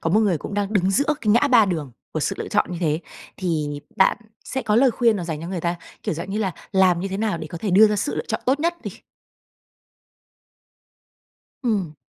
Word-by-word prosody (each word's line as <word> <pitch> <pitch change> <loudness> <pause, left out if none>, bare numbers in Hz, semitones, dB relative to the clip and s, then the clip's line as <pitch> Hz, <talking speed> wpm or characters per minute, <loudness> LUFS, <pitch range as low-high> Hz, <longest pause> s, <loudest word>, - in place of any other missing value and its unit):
có 165 - -1
một 210 +5 +4
người 195 -7 +2
cũng 200 - -7
đang 205 0 -1
đứng 190 -3 +2
giữa 285 +9 +2
cái 220 - -3
ngã 240 +6 +4
ba 240 -5 +6
đường 160 -9 -3 0.2
của 155 - -2
sự 150 - -1
lựa - - -4
chọn 205 -3 +1
như 175 - -4
thế, 155 -2 0 0.4
thì 150 -5 -2 0.2
bạn 190 - +4 0.3
sẽ 265 - -3
có 210 - +1
lời 260 +2 +5
khuyên 230 -2 +2
nào 180 - -4
dành 160 -3 -4
cho 165 - -6
người 185 -2 -3
ta? 170 +1 -1 0.3
Kiểu, - - -2
dạng 170 +4 -6
như 205 - -2
là, 195 -4 -1 0.2
làm 185 -3 +4
như 195 - -3
thế 190 - -3
nào 210 -4 -1
để 155 - -6
có 165 +2 -7
thể 205 +3 -2
đưa 205 +4 +7
ra 210 - 0
sự 205 - -1
lựa - - -3
chọn - - -1
tốt 270 +3 +2
nhất 340 +2 +1
đi? - - -5 2.7
Ừm. 200 - -1
195 Hz, 240 wpm, -23 LUFS, 170-220 Hz, 2.7 s, đưa